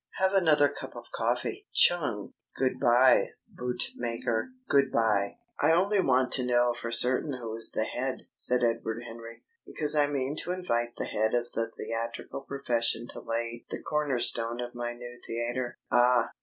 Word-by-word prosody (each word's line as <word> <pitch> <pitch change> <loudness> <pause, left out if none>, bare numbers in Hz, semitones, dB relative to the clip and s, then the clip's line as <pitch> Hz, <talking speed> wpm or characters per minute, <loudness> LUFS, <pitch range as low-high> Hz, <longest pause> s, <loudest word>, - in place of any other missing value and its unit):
Have 190 0 +2
another 155 -6 +5
cup 145 - -8
of - - -10
coffee. 415 - -2
Chung!... 145 - +3 0.2
Good 130 -1 0
bye, 125 +1 +5 0.2
Bootmaker, 120 - -2 0.2
good 140 -1 +3
bye!" 105 -3 +1 0.2
"I 155 +3 +5
only 195 +4 +3
want 130 -4 +2
to 130 - +2
know 120 -1 +3
for 120 -1 -6
certain 125 +5 +3
who 115 -3 -5
is 115 - +1
the 110 - -1
head," 130 +3 -3
said 125 0 +1
Edward 115 0 -1
Henry, 115 0 -10 0.2
"because 150 -1 -1
I 145 -1 +4
mean 140 0 -2
to 180 - -2
invite 120 -10 -2
the - - -1
head 110 +2 0
of 120 0 -1
the 115 0 -1
theatrical 115 +4 -4
profession 120 -4 0
to - - -5
lay 115 +1 -3
the - - -4
corner 150 -4 0
stone 115 0 +1
of 120 0 -5
my 120 0 -4
new 120 0 -10
theatre." 120 +1 -3
"Ah!" 120 -1 +4
120 Hz, 170 wpm, -29 LUFS, 115-135 Hz, 0.2 s, another